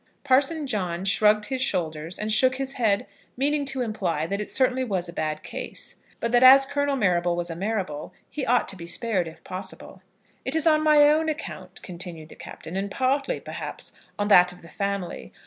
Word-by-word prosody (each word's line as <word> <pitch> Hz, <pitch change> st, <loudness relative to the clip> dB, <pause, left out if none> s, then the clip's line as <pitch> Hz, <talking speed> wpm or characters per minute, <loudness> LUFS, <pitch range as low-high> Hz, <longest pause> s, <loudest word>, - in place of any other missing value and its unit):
Parson 285 Hz, +3 st, +2 dB
John 185 Hz, -7 st, -2 dB
shrugged 210 Hz, +1 st, +4 dB
his 260 Hz, +2 st, -2 dB
shoulders, 165 Hz, -5 st, -2 dB
and 215 Hz, 0 st, -1 dB
shook 255 Hz, +3 st, +4 dB
his 270 Hz, 0 st, -3 dB
head, 215 Hz, -6 st, +1 dB, 0.3 s
meaning 285 Hz, +2 st, +1 dB
to 270 Hz, -1 st, -2 dB
imply 185 Hz, -9 st, -2 dB
that 200 Hz, +5 st, -2 dB
it 210 Hz, -, -5 dB
certainly 260 Hz, 0 st, +2 dB
was 190 Hz, -7 st, -1 dB
a 170 Hz, -, -8 dB
bad 155 Hz, -2 st, -3 dB
case, -, -, -7 dB, 0.2 s
but 235 Hz, -, -2 dB
that 240 Hz, 0 st, +4 dB
as 270 Hz, +1 st, +9 dB
Colonel 285 Hz, 0 st, 0 dB
Marrable 175 Hz, -7 st, +1 dB
was 175 Hz, 0 st, -3 dB
a -, -, -5 dB
Marrable, 185 Hz, -6 st, -3 dB, 0.2 s
he 295 Hz, -, -5 dB
ought 245 Hz, 0 st, +2 dB
to -, -, -6 dB
be 170 Hz, -2 st, -9 dB
spared, 190 Hz, -2 st, -1 dB
if 160 Hz, -, -12 dB
possible. 185 Hz, +1 st, -7 dB, 0.4 s
"It 265 Hz, -, -3 dB
is 320 Hz, 0 st, +1 dB
on 310 Hz, -1 st, +4 dB
my 300 Hz, -1 st, +6 dB
own 315 Hz, +2 st, +3 dB
account," 310 Hz, 0 st, -6 dB
continued 170 Hz, -3 st, -7 dB
the -, -, -12 dB
Captain, 165 Hz, -, -9 dB
"and 195 Hz, +1 st, -2 dB
partly, 275 Hz, -, 0 dB
perhaps, -, -, -5 dB, 0.3 s
on 205 Hz, -, 0 dB
that 180 Hz, -3 st, +7 dB
of 180 Hz, -1 st, -15 dB
the 165 Hz, -, -12 dB
family. 195 Hz, -, -4 dB
210 Hz, 200 wpm, -25 LUFS, 175-265 Hz, 0.4 s, as